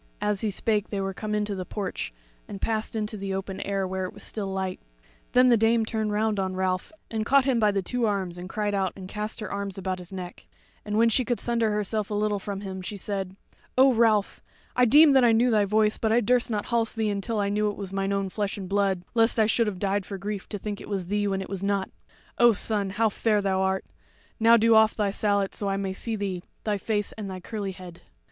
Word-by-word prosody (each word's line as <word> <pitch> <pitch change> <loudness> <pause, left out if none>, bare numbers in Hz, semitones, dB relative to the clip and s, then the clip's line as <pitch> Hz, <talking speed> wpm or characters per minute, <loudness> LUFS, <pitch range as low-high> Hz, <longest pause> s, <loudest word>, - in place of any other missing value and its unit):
As 210 -1 0
he 220 - 0
spake 210 +1 0
they 200 - -3
were 195 0 -2
come 210 +2 -3
into 210 -1 -1
the 185 -2 -4
porch, 190 - -4 0.4
and 195 - -7
passed 220 +1 -2
into 215 0 -2
the 195 -1 -3
open 195 0 -4
air, 195 -1 -1
where 190 0 -2
it 185 - -7
was - - -9
still 210 -3 -3
light; 190 -1 -3 0.5
then 250 0 +6
the 235 - +6
Dame 225 +1 +3
turned 220 -1 -2
round 210 0 0
on 190 -1 -1
Ralph 185 - -1 0.2
and 220 -1 -1
caught 275 +3 +4
him 260 -4 +2
by 215 -1 +4
the 200 -1 0
two 245 +4 0
arms 190 -4 -2
and 180 +1 -7
cried 210 0 -1
out 190 -2 0
and 190 -1 -8
cast 210 +3 -4
her 210 - -5
arms 200 -1 -4
about 185 -1 -3
his 180 +1 -11
neck; 180 -2 -8 0.4
and 210 0 -2
when 230 +1 +5
she 255 +3 +2
could 240 0 -1
sunder 230 -2 +1
herself 210 0 -1
a 210 - -2
little 210 0 0
from 200 0 -5
him, 190 -2 -6
she 200 +3 -6
said: 195 -1 -4 0.4
"O 265 0 +6
Ralph, 220 -3 +2 0.3
I 250 - +5
deemed 290 +4 +7
that 265 - +6
I 235 -1 +5
knew 240 +2 +3
thy 210 -2 +3
voice, 215 +1 +2
but 220 - +1
I 230 - +5
durst 245 +2 +2
not 210 -2 -2
halse 230 -2 0
thee 220 -2 0
till 225 +1 -2
I 200 -1 +1
knew 210 +1 +1
it 205 - -6
was 195 -2 -6
mine 195 0 -1
own 195 -1 -1
flesh 205 +1 -2
and 190 -2 -6
blood, 195 -2 +1
lest 225 0 +3
I 220 - +5
should 225 +1 +2
have 200 -3 -3
died 200 +1 0
for 195 +1 -6
grief 200 0 -5
to 205 - -4
think 205 +1 -5
it - - -10
was 195 -3 -2
thee 205 +2 0
when 195 -1 -1
it - - -9
was 195 -1 -5
not. 200 -1 -1 0.5
O 240 -1 +7
son, 205 -1 0
how 220 +3 +1
fair 210 0 +1
thou 190 -1 0
art! 190 0 0 0.5
Now 230 +1 +7
do 230 +1 +4
off 220 0 +5
thy 205 -2 0
sallet 200 -1 +1
that 205 - -3
I 195 0 0
may 195 -1 -2
see 225 +3 -3
thee, 195 -4 -3 0.2
thy 210 -2 -1
face 210 0 -1
and 210 -3 -7
thy 185 -1 -6
curly 200 0 -5
head." 180 -2 -11
205 Hz, 250 wpm, -26 LUFS, 195-220 Hz, 0.5 s, deemed